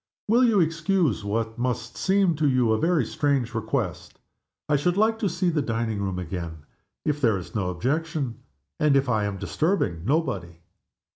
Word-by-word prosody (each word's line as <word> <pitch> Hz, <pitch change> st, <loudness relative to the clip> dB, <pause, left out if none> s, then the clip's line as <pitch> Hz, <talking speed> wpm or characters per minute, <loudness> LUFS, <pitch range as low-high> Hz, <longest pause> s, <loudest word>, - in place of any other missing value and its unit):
Will 235 Hz, +4 st, +4 dB
you 225 Hz, -5 st, +4 dB
excuse 165 Hz, -, +1 dB
what 110 Hz, +3 st, -2 dB
must 120 Hz, -1 st, -2 dB
seem 190 Hz, -3 st, +2 dB
to 150 Hz, -2 st, +2 dB
you 125 Hz, -3 st, +3 dB
a 110 Hz, -, +2 dB
very 165 Hz, -4 st, +2 dB
strange 140 Hz, -2 st, 0 dB
request? -, -, -3 dB, 0.5 s
I 150 Hz, -, +3 dB
should 175 Hz, +6 st, +1 dB
like 220 Hz, +1 st, +3 dB
to 205 Hz, -, +1 dB
see 175 Hz, +1 st, 0 dB
the 155 Hz, -2 st, +1 dB
dining 115 Hz, -4 st, -2 dB
room 95 Hz, -2 st, -2 dB
again, 85 Hz, -3 st, -5 dB, 0.4 s
if 150 Hz, -1 st, 0 dB
there 115 Hz, -6 st, +3 dB
is 90 Hz, +3 st, -9 dB
no 100 Hz, -5 st, -1 dB
objection, 135 Hz, -, -2 dB, 0.4 s
and 150 Hz, -2 st, +4 dB
if 135 Hz, 0 st, +3 dB
I 110 Hz, -4 st, +1 dB
am 100 Hz, -1 st, -3 dB
disturbing 105 Hz, -, -1 dB
nobody." 100 Hz, -, -1 dB
130 Hz, 170 wpm, -25 LUFS, 105-165 Hz, 0.5 s, Will